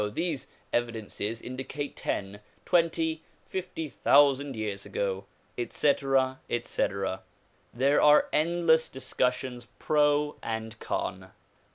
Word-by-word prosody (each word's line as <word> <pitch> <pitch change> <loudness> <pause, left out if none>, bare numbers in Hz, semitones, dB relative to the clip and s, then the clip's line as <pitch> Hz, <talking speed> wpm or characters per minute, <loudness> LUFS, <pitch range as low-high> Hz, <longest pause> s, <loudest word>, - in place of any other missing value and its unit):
these 165 -6 -2 0.3
evidences 115 -1 -2
indicate 135 +3 -5
ten, 100 +1 -3 0.3
twenty, 165 -2 +2 0.3
fifty 180 -4 -4
thousand 140 -1 +4
years 105 -3 -3
ago," 100 -1 -2 0.3
etc., 135 0 +1
etc. 100 -5 -1 0.5
There 135 +4 +3
are 150 0 +6
endless 160 0 +3
discussions 125 -1 -2
pro 150 -1 +2
and 110 0 -4
con. - - -3
135 Hz, 90 wpm, -28 LUFS, 115-150 Hz, 0.5 s, are